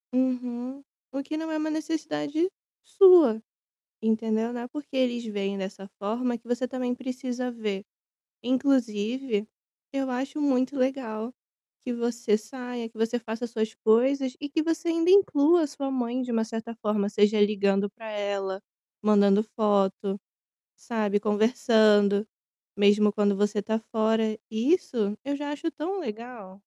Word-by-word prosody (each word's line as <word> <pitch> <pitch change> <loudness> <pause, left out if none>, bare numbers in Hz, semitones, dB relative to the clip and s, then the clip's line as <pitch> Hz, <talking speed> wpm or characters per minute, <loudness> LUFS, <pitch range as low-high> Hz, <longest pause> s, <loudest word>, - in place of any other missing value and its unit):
Uhum. 255 +1 -1 0.3
O 275 +1 -3
que 310 - -5
não 320 0 -4
é 310 - -1
uma 310 0 -1
necessidade 315 - -1 0.4
sua, 340 - +7 0.6
entendeu. 220 +1 0
Não 240 -1 -5
é 240 - -6
porque 285 0 -7
eles 240 -2 +1
veem 200 -2 -3
dessa 195 0 -6
forma, 235 +4 -1
que 230 - -28
você 245 +1 -1
também 250 -1 -2
precisa 255 -1 -4
ver. 215 -4 -4 0.6
Inclusive, 240 -3 0 0.4
eu 270 -1 -1
acho 265 +4 -3
muito 265 -1 +1
legal 255 -3 -2 0.5
que 250 - -2
você 235 -2 0
saia, 245 +1 -7
que 225 - -23
você 225 +2 0
faça 225 +1 -5
suas 220 -1 -2
coisas 260 +4 +3
e 290 - -4
que 315 +3 0
você 325 +1 -1
ainda 330 +1 +2
inclua 345 -4 +5
a 305 - +2
sua 280 -1 -5
mãe 255 -1 -1
de 250 - -5
uma 225 -1 +1
certa 225 0 -6
forma, 210 -3 0
seja 210 +1 +3
ligando 200 -1 +2
para 220 +1 -10
ela, 200 -2 -3 0.4
mandando 205 -1 +5
foto, 200 -2 +1 0.6
sabe, 210 -3 -1
conversando, 215 -1 +3 0.5
mesmo 205 +1 +4
quando 205 -1 +2
você 205 +1 +1
tá 220 +2 -1
fora. 220 0 +1
Isso 225 - +1
eu 285 +1 -1
já 290 0 -4
acho 330 +3 -3
tão 365 +7 -4
legal. 225 - -7
235 Hz, 145 wpm, -27 LUFS, 210-265 Hz, 0.6 s, sua